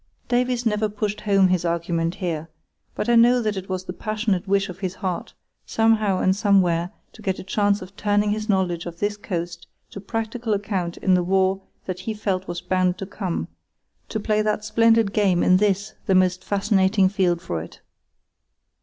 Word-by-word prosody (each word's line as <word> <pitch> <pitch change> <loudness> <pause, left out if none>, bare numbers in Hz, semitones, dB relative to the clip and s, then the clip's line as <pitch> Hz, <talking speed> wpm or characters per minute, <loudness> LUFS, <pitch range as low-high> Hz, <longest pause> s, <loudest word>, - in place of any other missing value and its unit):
Davies 245 0 +1
never 215 -1 +1
pushed 210 0 -3
home 195 -3 +3
his 180 -2 +1
argument 170 0 -1
here; 165 -4 -3 0.5
but - - -2
I 240 - +4
know 240 +2 +6
that 215 -3 -1
it 190 0 -6
was 185 0 -2
the 180 - -5
passionate 215 -3 -2
wish 200 0 +2
of 185 0 -9
his 190 -1 -3
heart, 185 -3 -4 0.3
somehow 220 -3 +2
and 190 +1 +2
somewhere, 185 -5 +2 0.2
to 220 - -14
get 190 -3 -1
a - - -7
chance 205 +1 +1
of 185 +2 -13
turning 205 0 +1
his 215 +1 -3
knowledge 180 -4 0
of 170 -1 -7
this 205 +3 -1
coast 175 -4 -5 0.2
to 200 - -8
practical 225 +2 -3
account 195 -4 -3
in 190 - +2
the 180 - +4
war 190 +1 +1 0.2
that 185 -1 -4
he 215 +4 -4
felt 190 -3 -2
was 175 0 -4
bound 185 -1 +1
to 195 - -5
come, 190 -3 -4 0.6
to 220 - -2
play 215 0 +1
that 215 0 -1
"splendid 225 -2 +3
game" 195 -5 +2
in 185 - +5
this, 205 +1 0
the 190 - +3
most 185 0 +2
fascinating 195 -1 +2
field 185 -3 +1
for 85 - -4
it. 80 - -11
195 Hz, 190 wpm, -23 LUFS, 185-210 Hz, 0.6 s, know